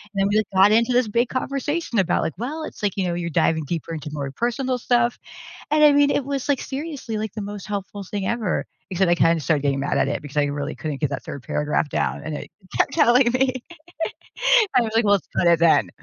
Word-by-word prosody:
And 195 Hz, -, +1 dB
then -, -, +2 dB
we 215 Hz, -, +3 dB
like 215 Hz, -, +1 dB
got 195 Hz, +2 st, +6 dB
into 230 Hz, +3 st, +3 dB
this 245 Hz, -2 st, +3 dB
big 235 Hz, +3 st, +1 dB
conversation 275 Hz, -1 st, -2 dB
about 180 Hz, -2 st, +1 dB
like, 160 Hz, -, -2 dB
"Well, 300 Hz, +7 st, -4 dB
it's -, -, -8 dB
like, 205 Hz, -1 st, -1 dB
you 185 Hz, -2 st, 0 dB
know, 175 Hz, -, -1 dB
you're 170 Hz, 0 st, -3 dB
diving 160 Hz, 0 st, +1 dB
deeper 165 Hz, +1 st, -4 dB
into 155 Hz, -1 st, -6 dB
more 140 Hz, -2 st, -4 dB
personal 245 Hz, -, -1 dB
stuff" 240 Hz, 0 st, +1 dB, 0.5 s
and 305 Hz, 0 st, +4 dB
I 295 Hz, -, +8 dB
mean, 285 Hz, 0 st, +4 dB
it 280 Hz, -, 0 dB
was 275 Hz, -1 st, -3 dB
like 275 Hz, -, +2 dB
seriously 275 Hz, -5 st, -5 dB
like 215 Hz, -2 st, -4 dB
the 215 Hz, -, -5 dB
most 205 Hz, -1 st, -6 dB
helpful 205 Hz, 0 st, -5 dB
thing 195 Hz, 0 st, -4 dB
ever 230 Hz, -5 st, -1 dB, 0.3 s
except 185 Hz, 0 st, +2 dB
I -, -, +5 dB
kinda 165 Hz, -1 st, +3 dB
started 145 Hz, 0 st, +1 dB
getting 140 Hz, -1 st, 0 dB
mad 140 Hz, -, -1 dB
at -, -, +2 dB
it -, -, -1 dB
because 145 Hz, 0 st, -11 dB
I 145 Hz, -, +4 dB
really 145 Hz, +1 st, -3 dB
couldn't 150 Hz, -3 st, -5 dB
get 150 Hz, -, 0 dB
that -, -, -4 dB
3rd 140 Hz, -, -8 dB
paragraph 150 Hz, 0 st, -1 dB
down, -, -, -1 dB
and 155 Hz, -, -5 dB
it -, -, -7 dB, 0.3 s
kept -, -, +2 dB
telling 250 Hz, -5 st, +4 dB
me 255 Hz, -1 st, +1 dB, 1.2 s
I 250 Hz, -, +6 dB
was 220 Hz, -, -3 dB
like, 230 Hz, -, +3 dB
"Well, 205 Hz, 0 st, +5 dB
screw 170 Hz, -, +1 dB
it 170 Hz, -, +2 dB
then." 160 Hz, -, +4 dB
205 Hz, 245 wpm, -23 LUFS, 165-250 Hz, 1.2 s, I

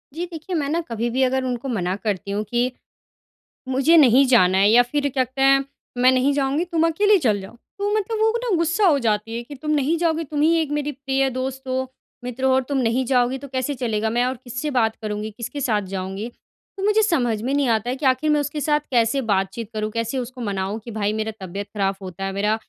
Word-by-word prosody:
जी, 345 Hz, +2 st, -2 dB
देखिए, 330 Hz, +3 st, -5 dB
मैं 295 Hz, -4 st, 0 dB
ना 325 Hz, +3 st, 0 dB
कभी 230 Hz, +1 st, -2 dB
भी 260 Hz, +3 st, +1 dB
अगर 260 Hz, 0 st, +1 dB
उनको 250 Hz, 0 st, -3 dB
मना 185 Hz, -6 st, -1 dB
करती 200 Hz, -2 st, -2 dB
हूँ 205 Hz, +1 st, -1 dB
कि, 245 Hz, +2 st, +1 dB, 1.0 s
मुझे 270 Hz, +6 st, +4 dB
नहीं 270 Hz, -3 st, +6 dB
जाना 190 Hz, -7 st, +4 dB
है, 200 Hz, +1 st, +5 dB
या 240 Hz, +2 st, +7 dB
फिर 285 Hz, +4 st, -1 dB
कहते 260 Hz, 0 st, -1 dB
हैं, 275 Hz, 0 st, +5 dB, 0.3 s
"मैं 250 Hz, +1 st, +6 dB
नहीं 260 Hz, +2 st, +2 dB
जाऊँगी, 280 Hz, +3 st, 0 dB
तुम 335 Hz, -2 st, +1 dB
अकेली 405 Hz, +5 st, +3 dB
चल 220 Hz, -, +1 dB
जाओ।" 190 Hz, +4 st, -11 dB, 0.2 s
तो 405 Hz, 0 st, -1 dB
मतलब 430 Hz, +1 st, -1 dB
वो 440 Hz, +1 st, +3 dB
ना 440 Hz, -7 st, +1 dB
गुस्सा 340 Hz, +5 st, +2 dB
हो 305 Hz, -6 st, +4 dB
जाती 215 Hz, +1 st, 0 dB
है 235 Hz, -, -4 dB
कि, 265 Hz, +5 st, -10 dB
"तुम 300 Hz, +3 st, -5 dB
नहीं 300 Hz, +2 st, +2 dB
जाओगी, 330 Hz, -1 st, 0 dB
तुम 295 Hz, 0 st, -3 dB
ही 320 Hz, +2 st, +4 dB
एक 310 Hz, -3 st, -2 dB
मेरी 295 Hz, 0 st, -2 dB
प्रिय 270 Hz, 0 st, 0 dB
दोस्त 260 Hz, +1 st, -4 dB
हो, 260 Hz, 0 st, -2 dB, 0.3 s
मित्र 250 Hz, +1 st, -5 dB
हो 265 Hz, -, +4 dB
और 265 Hz, -, +3 dB
तुम 280 Hz, -2 st, 0 dB
नहीं 250 Hz, +1 st, +1 dB
जाओगी 250 Hz, +1 st, +1 dB
तो 280 Hz, +1 st, -10 dB
कैसे 260 Hz, +2 st, -2 dB
चलेगा? 225 Hz, -4 st, -1 dB
मैं 240 Hz, +2 st, +1 dB
और 255 Hz, +1 st, -1 dB
किससे 250 Hz, +5 st, -4 dB
बात 220 Hz, 0 st, +1 dB
करुँगी, 210 Hz, 0 st, -3 dB
किसके 235 Hz, +6 st, -6 dB
साथ 220 Hz, -6 st, +1 dB
जाऊँगी?" 195 Hz, +4 st, -4 dB, 0.5 s
तो -, -, -4 dB
मुझे 425 Hz, +1 st, +3 dB
समझ 245 Hz, -, +1 dB
में 255 Hz, +4 st, -1 dB
नहीं 285 Hz, -2 st, +1 dB
आता 225 Hz, +1 st, +1 dB
है 255 Hz, -, -2 dB
कि 275 Hz, +1 st, -2 dB
आखिर 260 Hz, +4 st, +2 dB
मैं 300 Hz, -1 st, +3 dB
उसके 290 Hz, +1 st, -3 dB
साथ 295 Hz, 0 st, +2 dB
कैसे 240 Hz, +2 st, +2 dB
बात-चीत 195 Hz, +3 st, -1 dB
करूँ, 215 Hz, 0 st, -2 dB
कैसे 230 Hz, +3 st, -2 dB
उसको 250 Hz, +1 st, -6 dB
मनाऊँ 200 Hz, -1 st, -2 dB
कि 235 Hz, -, -7 dB
भई, 210 Hz, -2 st, -1 dB
मेरा 220 Hz, 0 st, -2 dB
तबीयत 195 Hz, +2 st, -6 dB
ख़राब 195 Hz, -1 st, 0 dB
होता 190 Hz, 0 st, -6 dB
है, 195 Hz, -, -2 dB
मेरा 205 Hz, +2 st, +1 dB
255 Hz, 235 wpm, -22 LUFS, 220-290 Hz, 1.0 s, या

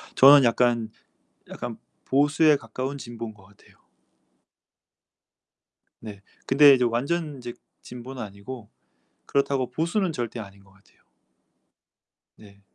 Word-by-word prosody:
저는 140 Hz, 0 st, +8 dB
약간 115 Hz, -1 st, +1 dB, 0.6 s
약간 -, -, -7 dB, 0.3 s
보수에 145 Hz, +3 st, +3 dB
가까운 130 Hz, +3 st, -6 dB
진보인 115 Hz, -3 st, -8 dB
거 95 Hz, -2 st, -20 dB
같아요. 100 Hz, +2 st, -23 dB, 2.3 s
네. 105 Hz, -3 st, -10 dB, 0.2 s
근데 140 Hz, +1 st, +7 dB
이제 125 Hz, -1 st, +1 dB
완전 145 Hz, +6 st, -2 dB
이제 120 Hz, -1 st, -7 dB, 0.3 s
진보는 125 Hz, +1 st, -9 dB
아니고 105 Hz, +3 st, -10 dB, 0.6 s
그렇다고 140 Hz, -2 st, 0 dB
보수는 170 Hz, +6 st, -1 dB
절대 120 Hz, -4 st, -5 dB
아닌 100 Hz, -2 st, -12 dB
거 95 Hz, -, -23 dB
같아요. 95 Hz, +1 st, -28 dB, 1.3 s
네. 100 Hz, -2 st, -18 dB
125 Hz, 235 characters per minute, -25 LUFS, 110-140 Hz, 2.3 s, 저는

